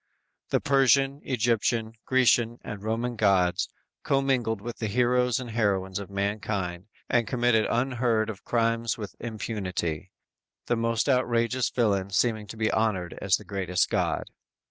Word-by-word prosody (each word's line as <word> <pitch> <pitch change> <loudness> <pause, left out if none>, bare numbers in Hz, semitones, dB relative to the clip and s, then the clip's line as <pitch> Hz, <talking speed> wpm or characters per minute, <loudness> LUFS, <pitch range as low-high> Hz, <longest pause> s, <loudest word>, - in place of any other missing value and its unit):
The - - +2
Persian, 135 0 +3
Egyptian, 115 -2 0
Grecian 120 -2 +3
and 105 -2 -7
Roman 115 +3 -2
gods 95 -5 +2 0.3
commingled 130 -5 +1
with 120 +3 -7
the 110 - -1
heroes 125 +2 +2
and 125 -2 -6
heroines 100 -4 0
of 100 - -8
mankind 100 -2 -3 0.2
and 120 -2 +1
committed 120 -3 +2
unheard 120 -3 +1
of 110 -4 -7
crimes 115 -1 0
with 105 -3 -7
impunity, 95 -8 -4 0.5
the 120 - +1
most 115 +1 0
outrageous 125 -2 +1
villain 100 -5 +1
seeming 110 +1 0
to 110 - -9
be 110 0 +1
honored 95 -6 0
as 100 -2 +3
the 105 - -13
greatest 90 -2 0
god! - - -1
115 Hz, 140 wpm, -27 LUFS, 100-120 Hz, 0.5 s, Persian